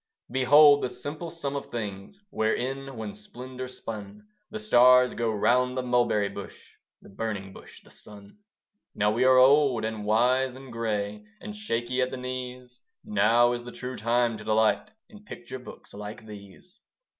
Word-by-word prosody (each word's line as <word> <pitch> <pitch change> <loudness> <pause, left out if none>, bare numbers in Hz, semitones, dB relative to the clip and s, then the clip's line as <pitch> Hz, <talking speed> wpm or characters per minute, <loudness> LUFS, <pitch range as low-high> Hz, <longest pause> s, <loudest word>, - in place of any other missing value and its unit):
Behold 145 +3 +6
the - - -1
simple 155 +6 -6
sum 145 -4 -5
of 140 - -5
things, 105 - -6
Where, 110 0 +1
in 135 +1 -4
one 110 -2 -5
splendour 125 +4 -8
spun, 115 - -9 0.2
The 215 - -6
stars 125 - +5
go 115 -1 -1
round 125 +4 +1
the 130 - -1
Mulberry 120 -4 +1
Bush, 100 0 -11 0.3
The - - -15
Burning 100 -2 -5
Bush, - - -14
the - - -19
Sun. 100 - -14 0.6
Now 105 0 +2
we 120 +4 +1
are 130 0 +6
old 130 -3 +5
and 110 -1 -4
wise 125 +4 +2
and 130 -2 -11
grey, 105 -2 -3 0.2
And 210 - -8
shaky 125 - -2
at 125 - +1
the 130 - -6
knees; 125 -1 -7 0.3
Now 115 +4 +3
is 120 0 -3
the 120 - -9
true 125 +1 -7
time 115 0 0
to - - -9
delight 110 - +1 0.2
In 210 -3 -16
picture 130 - -9
books 125 - -13
like 105 +2 -8
these. 105 - -13
120 Hz, 170 wpm, -27 LUFS, 110-130 Hz, 0.6 s, Behold